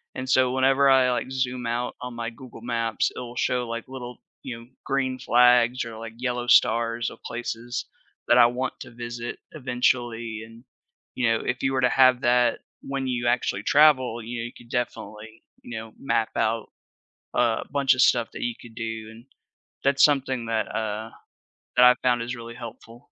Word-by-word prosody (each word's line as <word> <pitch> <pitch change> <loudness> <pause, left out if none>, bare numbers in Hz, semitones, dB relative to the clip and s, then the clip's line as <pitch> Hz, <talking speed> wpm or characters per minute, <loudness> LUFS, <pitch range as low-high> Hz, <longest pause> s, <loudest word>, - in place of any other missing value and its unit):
and 130 0 -5
so 130 -1 +3
whenever 135 +1 +4
I, 130 -1 +5
like, 125 +1 -2
zoom 125 -2 -2
out 120 +1 -2
on 125 -1 -6
my 115 0 -4
Google 120 0 -13
Maps, 115 -2 -1
it'll 120 0 -7
show, 125 -1 0
like, 115 0 -4
little, 125 -2 -8 0.2
you 120 -3 -6
know, 115 - -13 0.2
green 130 -2 -1
flags 125 +1 +4
or, 115 -1 -8
like, 115 0 -8
yellow 125 -1 -2
stars 115 0 +3
of - - -14
places 120 0 -4 0.4
that 120 - +6
I 120 - +8
want 125 +2 -1
to 120 - -9
visit 120 0 -6
eventually 120 -5 -1
and, 115 +2 -15 0.5
you 125 -2 0
know, 115 - +1
if 125 0 -2
you 135 0 +1
were 130 - +1
to 125 - +4
have 130 -1 +5
that 120 0 +3 0.2
when 135 -1 -4
you 120 -1 -1
actually 120 -4 0
travel, 130 -6 +4
you 120 +1 -5
know, 115 - -3
you 120 - -7
could 120 -1 -16
definitely 110 -3 -5 0.3
you - - -9
know, 110 0 -10
map 115 -4 0
out 115 0 0 0.7
a 115 -2 +2
bunch 140 -2 +3
of 130 - +2
stuff 120 -3 +4
that - - -8
you 120 -1 -1
could 115 -2 -13
do 110 -1 -5
and 115 +2 -14 0.6
that's 140 0 +3
something 130 -4 +2
that, 110 -1 0
uh, 110 0 -3 0.7
that 125 - +8
I 125 0 +8
found 120 -2 +2
is 120 +2 -4
really 115 0 -9
helpful. 115 0 -11
120 Hz, 185 wpm, -25 LUFS, 115-130 Hz, 0.7 s, I